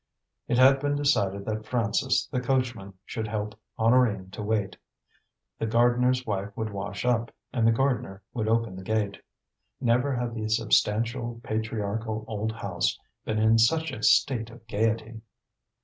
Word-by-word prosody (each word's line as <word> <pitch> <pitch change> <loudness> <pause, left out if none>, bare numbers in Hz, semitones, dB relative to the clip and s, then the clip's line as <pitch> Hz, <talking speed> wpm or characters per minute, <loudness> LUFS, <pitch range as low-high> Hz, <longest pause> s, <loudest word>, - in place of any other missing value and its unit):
It 120 - +1
had 135 +2 +6
been 145 +1 0
decided 100 -9 +1
that 110 0 -4
Francis, 120 +2 +1
the 125 -3 -3
coachman, 120 -6 -1
should 110 -2 -4
help 105 0 -3 0.2
Honorine 110 -5 +3
to 105 - -7
wait. 105 -1 -1 0.8
The 115 - -1
gardener's 120 +2 +3
wife 100 -1 -2
would 110 -1 -2
wash 100 +2 -5
up, 120 -2 +1 0.2
and 115 -2 +2
the - - +6
gardener 115 -6 -1
would 110 -3 -2
open 115 -3 +1
the 95 - -7
gate. 100 0 -1 0.6
Never 125 +2 +2
had 120 -1 -2
the 110 -1 -3
substantial, 115 +1 +1
patriarchal 110 0 -3
old 110 0 -2
house 115 - -1 0.3
been 110 - -1
in 110 +1 +4
such 160 +7 +3
a 115 - -7
state 115 -1 +3
of 115 -1 -14
gaiety. 110 +1 -1
115 Hz, 150 wpm, -27 LUFS, 110-120 Hz, 0.8 s, had